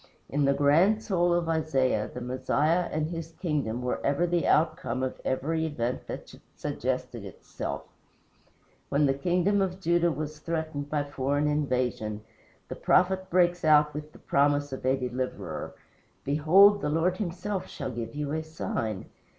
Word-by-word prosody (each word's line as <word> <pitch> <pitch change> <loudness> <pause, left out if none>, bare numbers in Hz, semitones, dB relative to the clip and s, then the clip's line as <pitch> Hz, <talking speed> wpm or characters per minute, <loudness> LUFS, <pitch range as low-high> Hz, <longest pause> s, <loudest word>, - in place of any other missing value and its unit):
In 145 0 +1
the 140 - +4
grand 165 +10 +4
soul 175 -4 +1
of 175 -1 +1
Isaiah, 135 -9 +1
the 125 - -7
Messiah 145 +7 +1
and 155 0 0
his 165 -1 -6
kingdom 145 -10 -2
were 125 - -2
ever 145 +5 +2
the 175 -1 0
outcome 155 -4 +1
of 130 - -4
every 160 +5 -1
event 125 -5 -3
that - - -7 0.2
suggested - - -3
itself. - - -6 1.1
When 145 +1 +3
the 135 - +3
kingdom 180 +7 +1
of 185 -1 -1
Judah 170 -1 +2
was 155 0 -5
threatened 155 -3 -3
by 150 -1 0
foreign 145 +1 -1
invasion, 125 -7 -1 0.4
the - - -6
prophet 190 +1 +2
breaks 175 -1 +2
out 150 -1 +5
with 150 +1 -6
the - - -15
promise 145 0 +1
of 130 - -6
a 130 +1 +3
Deliverer: 125 0 -4 0.5
"Behold, 185 +8 +5
the 150 - -1
Lord 165 +4 +1
himself 185 +1 -3
shall 135 -2 -5
give 115 +1 -6
you 145 -1 -3
a 160 +1 -1
sign. 115 -10 -4
150 Hz, 155 wpm, -28 LUFS, 135-175 Hz, 1.1 s, out